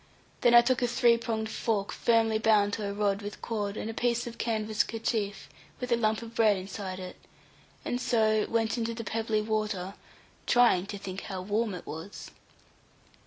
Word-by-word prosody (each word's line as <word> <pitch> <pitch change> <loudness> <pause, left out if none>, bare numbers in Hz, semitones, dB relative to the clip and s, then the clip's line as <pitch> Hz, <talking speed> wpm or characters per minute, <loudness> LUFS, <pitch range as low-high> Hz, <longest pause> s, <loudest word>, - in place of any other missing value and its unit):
Then 240 -1 +5
I 240 - +10
took 255 0 +1
a 245 - +2
three 235 0 +4
pronged 220 -2 -2
fork 210 -4 -1
firmly 225 -2 +2
bound 210 -2 +3
to 205 -2 -2
a - - -3
rod 200 0 0
with 205 0 -7
cord, 210 -2 -3
and - - -4
a 225 - -4
piece 240 +1 0
of 235 -1 -8
canvas 220 -2 0
kerchief, 220 -3 -3 0.3
with 250 -1 -4
a - - +6
lump 220 -1 0
of 230 0 -10
bread 215 -4 +4
inside 190 0 -6
it; 185 -1 -8 0.7
and 245 - -2
so 215 -3 +2
went 225 +1 0
into 230 0 -2
the 230 - -5
pebbly 220 -1 -1
water, 210 -3 -2 0.5
trying 235 -7 +4
to 205 - -5
think 190 -1 -6
how 190 -2 -5
warm 210 +1 -1
it 180 - -9
was. 160 +6 -8
220 Hz, 185 wpm, -29 LUFS, 205-230 Hz, 0.7 s, I